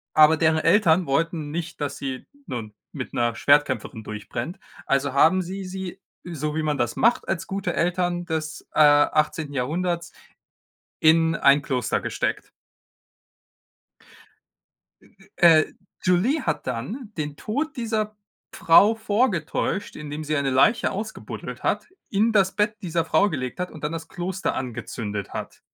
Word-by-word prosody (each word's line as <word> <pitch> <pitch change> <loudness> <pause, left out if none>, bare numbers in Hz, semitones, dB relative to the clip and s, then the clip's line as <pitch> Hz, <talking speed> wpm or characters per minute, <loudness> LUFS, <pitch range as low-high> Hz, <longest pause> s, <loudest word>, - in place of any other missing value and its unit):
aber 155 +1 +7
deren 160 0 +3
Eltern 170 0 +4
wollten 155 +2 -1
nicht, 165 +1 -5
dass 140 -1 -3
sie, 130 -2 -5 0.2
nun, 110 -4 -5 0.2
mit - - -6
'ner 120 -1 0
Schwertkämpferin 130 -6 +1
durchbrennt. 120 - -6 0.3
Also 135 0 +1
haben 165 +7 +4
sie 190 +2 -6
sie, 185 0 -6 0.2
so 155 -3 -4
wie 160 - 0
man 150 -2 -1
das 120 -1 0
macht 235 +2 +2
als 190 -3 -2
gute 190 -2 -2
Eltern 175 0 0
des, 160 -2 -4
äh, - - -3
18. 150 0 +3
Jahrhunderts, 170 +6 -2 0.9
in 160 +1 +4
ein 140 -2 +4
Kloster 125 -5 -1
gesteckt. - - -3 2.5
E - - -21 0.3
e 165 -3 +7
äh, - - -16 0.3
Julie 205 - +2
hat - - -2
dann 210 - -5
den 150 -2 -4
Tod 290 +7 -3
dieser 220 -3 -2 0.4
Frau 185 +5 +5
vorgetäuscht, 205 -3 -1
indem 150 0 -6
sie 155 +1 -1
eine 140 -1 0
Leiche 210 - +3
ausgebuddelt 210 +3 -6
hat, - - -1 0.2
in 215 +3 +2
das 195 -3 +3
Bett 210 0 +1
dieser 170 -2 -1
Frau 160 +5 +3
gelegt 130 -6 -4
hat 180 - -2
und 155 - -12
dann 150 - -1
das 165 -1 -6
Kloster 185 +2 -3
angezündet 110 -5 -5
hat. - - -6
165 Hz, 145 wpm, -24 LUFS, 145-190 Hz, 2.5 s, aber